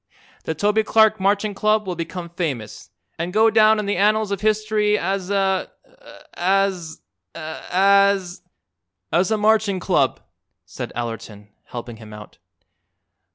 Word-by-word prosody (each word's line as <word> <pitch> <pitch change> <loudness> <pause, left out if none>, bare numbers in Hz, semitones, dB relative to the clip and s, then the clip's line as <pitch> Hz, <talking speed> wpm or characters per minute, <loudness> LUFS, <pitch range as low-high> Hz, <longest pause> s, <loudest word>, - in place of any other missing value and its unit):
The 160 - -2
Toby 210 +6 +2
Clark 220 0 +3
Marching 200 +2 +1
Club 215 +1 +1
will 185 - -3
become 170 +1 -6
famous, 140 - -5 0.3
an' 170 +1 -2
go 220 +4 +3
down 220 0 +5
in 210 - -2
the 200 -1 -1
annals 210 +1 +2
of 200 - -3
history 215 -1 +1
as 190 0 -2
a 195 -2 0 0.6
as 185 -3 -1 0.3
as 195 +3 +1 0.3
" 90 +2 -24
"As 180 +4 +2
a 220 - +1
Marching 210 -2 +2
Club," - - +1 0.5
said - - -7
Allerton, 115 -3 -6 0.2
helping 120 -1 -8
him 110 -1 -12
out. 105 0 -13
195 Hz, 135 wpm, -21 LUFS, 160-210 Hz, 0.6 s, down